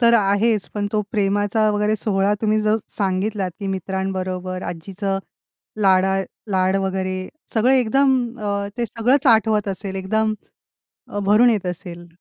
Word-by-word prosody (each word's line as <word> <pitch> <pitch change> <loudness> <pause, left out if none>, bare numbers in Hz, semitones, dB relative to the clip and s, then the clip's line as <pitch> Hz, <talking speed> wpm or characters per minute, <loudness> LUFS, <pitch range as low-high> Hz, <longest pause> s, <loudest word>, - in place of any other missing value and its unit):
तर 235 -1 +5
आहेच 210 0 +2
पण 205 -1 -1
तो 215 - +2
प्रेमाचा 205 0 +1
वगैरे 210 +1 +1
सोहळा 200 -1 +1
तुम्ही 215 0 +2
जो 215 0 +2 0.2
सांगितलात, 195 0 -1
की 200 - -4
मित्रांबरोबर 185 -1 -3
आज्जीचं 195 +3 -3 0.6
लाडा 190 0 +4 0.3
लाड 190 0 +2
वगैरे 185 -1 -2 0.3
सगळं 240 +3 +4
एकदम 265 +2 +3 0.3
अ, 200 -1 -2
ते 240 -1 -1
सगळंच 250 +6 +1
आठवत 220 -3 +4
असेल 195 0 -4
एकदम 215 +3 0 0.8
अ, 205 - -4
भरून 210 +5 +5
येत 210 -5 0
असेल. 175 -1 -6
200 Hz, 140 wpm, -21 LUFS, 190-220 Hz, 0.8 s, तर